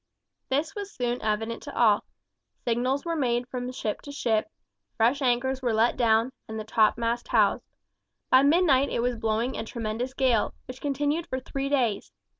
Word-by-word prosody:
This 295 Hz, +4 st, 0 dB
was 405 Hz, -1 st, -6 dB
soon 245 Hz, 0 st, -2 dB
evident 225 Hz, +2 st, -2 dB
to -, -, -9 dB
all. 215 Hz, -4 st, +4 dB, 0.6 s
Signals 250 Hz, +5 st, 0 dB
were 335 Hz, -1 st, -1 dB
made 245 Hz, -4 st, 0 dB
from 250 Hz, 0 st, -4 dB
ship 215 Hz, -4 st, -3 dB
to 285 Hz, -, -9 dB
ship, 230 Hz, -6 st, 0 dB, 0.5 s
fresh 245 Hz, +6 st, +2 dB
anchors 260 Hz, +1 st, +1 dB
were 245 Hz, -3 st, 0 dB
let 225 Hz, +2 st, +3 dB
down, 230 Hz, 0 st, +3 dB, 0.2 s
and 220 Hz, 0 st, -5 dB
the -, -, -4 dB
topmast 230 Hz, +2 st, +1 dB
housed. -, -, +3 dB, 0.7 s
By 260 Hz, -, +7 dB
midnight 285 Hz, -2 st, +4 dB
it 235 Hz, -, -1 dB
was 245 Hz, 0 st, 0 dB
blowing 225 Hz, +2 st, -1 dB
a -, -, -3 dB
tremendous 230 Hz, +3 st, -4 dB
gale, 255 Hz, -5 st, +2 dB
which 255 Hz, 0 st, -9 dB
continued 290 Hz, +3 st, -1 dB
for 260 Hz, -, -3 dB
three 275 Hz, +1 st, -4 dB
days. 240 Hz, -, 0 dB
245 Hz, 170 wpm, -27 LUFS, 225-270 Hz, 0.7 s, By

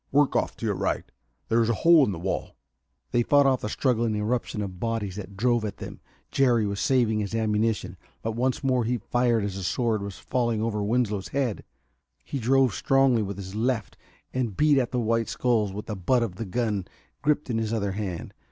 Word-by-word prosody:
"Work 145 Hz, 0 st, +3 dB
off -, -, 0 dB
to -, -, -5 dB
your -, -, +1 dB
right. -, -, -1 dB, 0.4 s
There's 115 Hz, 0 st, +2 dB
a 115 Hz, -, +2 dB
hole 165 Hz, -3 st, +8 dB
in 125 Hz, -, +1 dB
the 90 Hz, -, -4 dB
wall 95 Hz, +3 st, -3 dB, 0.3 s
" -, -, -49 dB
They 120 Hz, -, +3 dB
fought 145 Hz, +4 st, +4 dB
off 130 Hz, -2 st, +3 dB
the 105 Hz, -, -3 dB
struggling 115 Hz, -3 st, +1 dB
eruption 105 Hz, 0 st, -1 dB
of 95 Hz, -3 st, -7 dB
bodies 110 Hz, -4 st, -2 dB
that 100 Hz, -1 st, -8 dB
drove 120 Hz, +1 st, +2 dB
at 105 Hz, -3 st, -4 dB
them. -, -, -8 dB, 0.3 s
Jerry 120 Hz, -5 st, +3 dB
was 100 Hz, 0 st, -2 dB
saving 120 Hz, -5 st, +2 dB
his 105 Hz, +1 st, -3 dB
ammunition, 105 Hz, -4 st, 0 dB, 0.3 s
but 115 Hz, -, -1 dB
once 125 Hz, +4 st, -1 dB
more 130 Hz, -2 st, +2 dB
he 120 Hz, +2 st, 0 dB
fired 120 Hz, 0 st, +1 dB
as 100 Hz, -1 st, -3 dB
a 95 Hz, -, -5 dB
sword 110 Hz, +3 st, 0 dB
was 100 Hz, -1 st, -6 dB
falling 120 Hz, -3 st, -1 dB
over 105 Hz, -2 st, -1 dB
Winslow's 105 Hz, -3 st, 0 dB
head. 130 Hz, -6 st, -2 dB, 0.6 s
He 140 Hz, -, -4 dB
drove 130 Hz, 0 st, +3 dB
strongly 135 Hz, -2 st, +3 dB
with 100 Hz, -2 st, -4 dB
his 95 Hz, -1 st, -7 dB
left 115 Hz, 0 st, -1 dB, 0.4 s
and 120 Hz, -7 st, -2 dB
beat 150 Hz, -2 st, +4 dB
at 125 Hz, -, 0 dB
the 125 Hz, -, -2 dB
white 115 Hz, 0 st, 0 dB
skulls 115 Hz, -5 st, +1 dB
with 105 Hz, +2 st, -6 dB
the 105 Hz, -, -4 dB
butt 120 Hz, +6 st, +2 dB
of 95 Hz, -6 st, -4 dB
the 115 Hz, -, -4 dB
gun 105 Hz, -2 st, -1 dB, 0.3 s
gripped 150 Hz, -2 st, +1 dB
in 115 Hz, -, 0 dB
his 110 Hz, -1 st, -2 dB
other 100 Hz, -3 st, 0 dB
hand. 95 Hz, -4 st, -5 dB
115 Hz, 210 wpm, -26 LUFS, 105-125 Hz, 0.6 s, hole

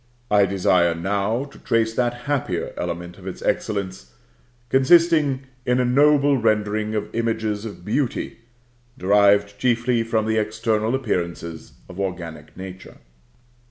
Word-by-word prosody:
I 100 Hz, -1 st, +5 dB
desire 90 Hz, -3 st, +2 dB
now 100 Hz, +7 st, -1 dB
to 140 Hz, -, -15 dB
trace 115 Hz, -1 st, +1 dB
that 120 Hz, 0 st, -1 dB
happier 130 Hz, -12 st, -2 dB
element 85 Hz, +2 st, -5 dB
of 95 Hz, -, -11 dB
its 95 Hz, -, -7 dB
excellence, 100 Hz, -2 st, -2 dB, 0.6 s
consisting 145 Hz, 0 st, +4 dB, 0.2 s
in 125 Hz, +1 st, +1 dB
a 125 Hz, -, +2 dB
noble 140 Hz, +2 st, +4 dB
rendering 110 Hz, -1 st, 0 dB
of 105 Hz, 0 st, -3 dB
images 110 Hz, -2 st, -1 dB
of 100 Hz, -5 st, -9 dB
Beauty, 120 Hz, +2 st, -2 dB, 0.6 s
derived 100 Hz, 0 st, +3 dB
chiefly 120 Hz, -1 st, +1 dB
from 115 Hz, -1 st, 0 dB
the 110 Hz, 0 st, 0 dB
external 110 Hz, +2 st, 0 dB
appearances 85 Hz, -9 st, -4 dB
of 90 Hz, +1 st, -10 dB
organic 85 Hz, -5 st, -5 dB
nature. 95 Hz, 0 st, -9 dB
110 Hz, 125 wpm, -22 LUFS, 95-120 Hz, 0.6 s, I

